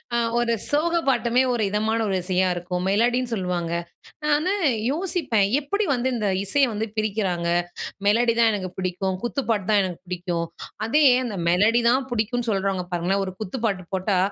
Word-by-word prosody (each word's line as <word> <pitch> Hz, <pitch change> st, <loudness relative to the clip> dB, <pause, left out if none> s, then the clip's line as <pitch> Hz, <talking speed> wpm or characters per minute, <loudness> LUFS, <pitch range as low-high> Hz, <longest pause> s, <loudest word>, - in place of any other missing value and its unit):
அ -, -, +3 dB, 0.2 s
ஒரு 235 Hz, -1 st, +1 dB, 0.2 s
சோக 315 Hz, +4 st, +1 dB, 0.2 s
பாட்டுமே 245 Hz, -1 st, +2 dB
ஒரு 225 Hz, -3 st, 0 dB
இதமான 220 Hz, +2 st, 0 dB
ஒரு 190 Hz, -, 0 dB
இசையா 185 Hz, 0 st, +1 dB
இருக்கும் 180 Hz, +1 st, -3 dB
மெலடின்னு 240 Hz, +4 st, +1 dB
சொல்லுவாங்க. 180 Hz, -4 st, -2 dB, 0.5 s
நான் 300 Hz, -1 st, +3 dB
வந்து 365 Hz, +6 st, 0 dB, 0.4 s
யோசிப்பேன், 295 Hz, -, +1 dB, 0.2 s
"எப்படி 405 Hz, +9 st, -1 dB
வந்து 255 Hz, +1 st, 0 dB
இந்த 215 Hz, -3 st, -1 dB, 0.2 s
இசையை 275 Hz, +6 st, +3 dB
வந்து 220 Hz, +2 st, -2 dB
பிரிக்கிறாங்க, 195 Hz, -5 st, -1 dB, 0.6 s
மெலடி 230 Hz, +2 st, +3 dB
தான் 230 Hz, -1 st, +5 dB
எனக்கு 185 Hz, -2 st, -3 dB
புடிக்கும் 185 Hz, 0 st, -2 dB
குத்து 265 Hz, +3 st, -2 dB
பாட்டுதா 210 Hz, 0 st, +1 dB
எனக்கு 180 Hz, -3 st, -4 dB
புடிக்கும்." 175 Hz, -2 st, -3 dB, 0.4 s
அதே 295 Hz, +6 st, +3 dB, 0.2 s
அந்த 210 Hz, -5 st, -4 dB
மெலடி 215 Hz, +7 st, +4 dB
தான் 260 Hz, +2 st, +1 dB
பிடிக்கும்னு 235 Hz, +1 st, -1 dB
சொல்றவங்க 195 Hz, -2 st, -1 dB
பாருங்களேன் 190 Hz, +3 st, 0 dB
ஒரு 185 Hz, -, -6 dB
குத்து 215 Hz, +4 st, -4 dB
பாட்டு 190 Hz, -4 st, -1 dB
போட்டா 190 Hz, 0 st, 0 dB
215 Hz, 165 wpm, -24 LUFS, 185-245 Hz, 0.6 s, தான்